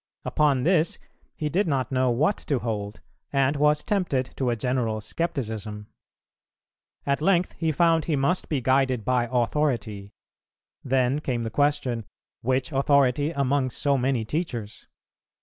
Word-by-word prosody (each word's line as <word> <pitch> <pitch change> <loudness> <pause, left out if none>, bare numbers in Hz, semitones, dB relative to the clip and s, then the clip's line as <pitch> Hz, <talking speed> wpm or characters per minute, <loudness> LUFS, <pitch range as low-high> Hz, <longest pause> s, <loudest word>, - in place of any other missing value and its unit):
Upon 140 -4 +2
this, 170 0 +2 0.4
he 155 - -2
did 180 +7 +1
not 135 -4 -1
know 130 -1 +2
what 150 - +2
to 140 - +1
hold, 105 -3 -4 0.3
and 135 +1 +2
was 150 +1 +2
tempted 165 -11 0
to 130 -2 0
a 120 - +1
general 115 -2 -1
scepticism. 110 - -4 1.2
At 140 +1 0
length 180 +1 +2
he 160 -1 -1
found 165 0 +3
he 160 - 0
must 140 +6 0
be 145 -4 0
guided 130 -3 +1
by 125 -1 +1
Authority; 115 -6 -1 0.7
then 130 +1 +1
came 125 -5 -2
the 115 - -4
question, 130 -5 0 0.4
Which 130 +3 0
authority 140 0 +3
among 140 -3 0
so 140 +3 0
many 130 -3 0
teachers? 120 -7 -4
135 Hz, 140 wpm, -25 LUFS, 120-150 Hz, 1.2 s, found